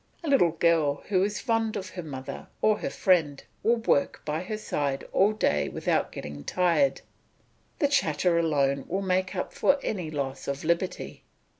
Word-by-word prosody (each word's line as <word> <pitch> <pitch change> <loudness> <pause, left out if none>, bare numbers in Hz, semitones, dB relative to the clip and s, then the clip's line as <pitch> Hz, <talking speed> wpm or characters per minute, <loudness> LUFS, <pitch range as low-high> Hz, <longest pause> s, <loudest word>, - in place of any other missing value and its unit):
A - - -4
little 255 - +4
girl 160 -4 +2
who 185 -3 +3
is 205 +2 0
fond 225 -2 0
of 190 -1 -4
her 180 - -6
mother 135 -5 -7
or 215 -1 +3
her - - -2
friend 160 -7 +2 0.2
will 235 - +3
work 225 -11 +1
by 155 +2 -2
her 215 +4 -4
side 140 -9 -2
all 200 +3 +4
day 145 - +1
without - - 0
getting 75 0 -7
tired; 180 - +2 0.8
the 290 - +3
chatter 170 - +2
alone 140 -4 +1
will 190 +3 -2
make 185 +1 0
up 180 - -3
for 280 - +3
any 180 -7 -3
loss 140 -3 -4
of 140 0 -3
liberty. 170 +3 -2
175 Hz, 170 wpm, -27 LUFS, 145-205 Hz, 0.8 s, little